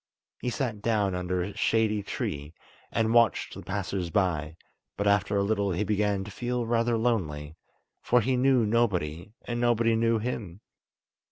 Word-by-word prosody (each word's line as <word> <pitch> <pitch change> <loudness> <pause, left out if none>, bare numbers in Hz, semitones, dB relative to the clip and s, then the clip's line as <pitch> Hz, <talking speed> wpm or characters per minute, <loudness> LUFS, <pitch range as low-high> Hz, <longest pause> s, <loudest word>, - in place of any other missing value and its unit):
He 125 - -2
sat 120 -5 -3
down 105 -3 +1
under 90 0 -1
a 100 +2 -6
shady 110 -1 +1
tree, 75 -4 -4 0.4
and 115 0 +1
watched 115 -3 +3
the - - -8
passers 95 -2 -3
by, 80 -3 0 0.4
but 100 - -1
after 100 0 +2
a 100 - +2
little 100 -2 0
he 90 +5 0
began 105 -1 0
to 105 - -9
feel 120 +3 -2
rather 115 0 +1
lonely, 80 -11 -1 0.5
for 125 - +3
he 130 +2 +1
knew 125 -2 +3
nobody 100 -7 0
and 120 0 -3
nobody 115 -1 +3
knew 115 0 +2
him. 105 -5 -4
105 Hz, 160 wpm, -28 LUFS, 95-115 Hz, 0.5 s, watched